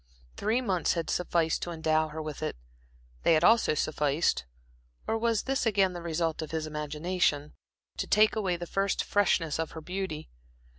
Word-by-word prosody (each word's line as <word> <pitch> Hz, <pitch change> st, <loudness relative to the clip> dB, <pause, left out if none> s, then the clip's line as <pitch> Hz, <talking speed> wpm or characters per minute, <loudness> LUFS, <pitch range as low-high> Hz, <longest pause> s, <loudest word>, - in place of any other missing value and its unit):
Three 225 Hz, +5 st, 0 dB
months 190 Hz, -8 st, +1 dB
had 165 Hz, -2 st, -2 dB
sufficed 170 Hz, -2 st, +1 dB
to -, -, -3 dB
endow 160 Hz, -1 st, +1 dB
her 155 Hz, +1 st, -6 dB
with 155 Hz, -1 st, -6 dB
it. 155 Hz, -, -2 dB, 0.7 s
They 165 Hz, -, +4 dB
had 155 Hz, -, +2 dB
also 225 Hz, -5 st, +5 dB
sufficed 150 Hz, -, +1 dB, 0.6 s
or 225 Hz, -, 0 dB
was 225 Hz, -1 st, +1 dB
this 270 Hz, -2 st, 0 dB
again 195 Hz, -3 st, +3 dB
the 175 Hz, -, -6 dB
result 165 Hz, -1 st, -1 dB
of 155 Hz, -, -5 dB
his 160 Hz, -1 st, -2 dB
imagination? 150 Hz, 0 st, -1 dB, 0.4 s
to -, -, -2 dB
take 215 Hz, +1 st, +4 dB
away 195 Hz, -5 st, 0 dB
the 175 Hz, -, -5 dB
first 195 Hz, +2 st, 0 dB
freshness 165 Hz, -6 st, +1 dB
of 165 Hz, -, -3 dB
her 160 Hz, -, -7 dB
beauty. 180 Hz, -2 st, -5 dB
170 Hz, 170 wpm, -29 LUFS, 155-195 Hz, 0.7 s, also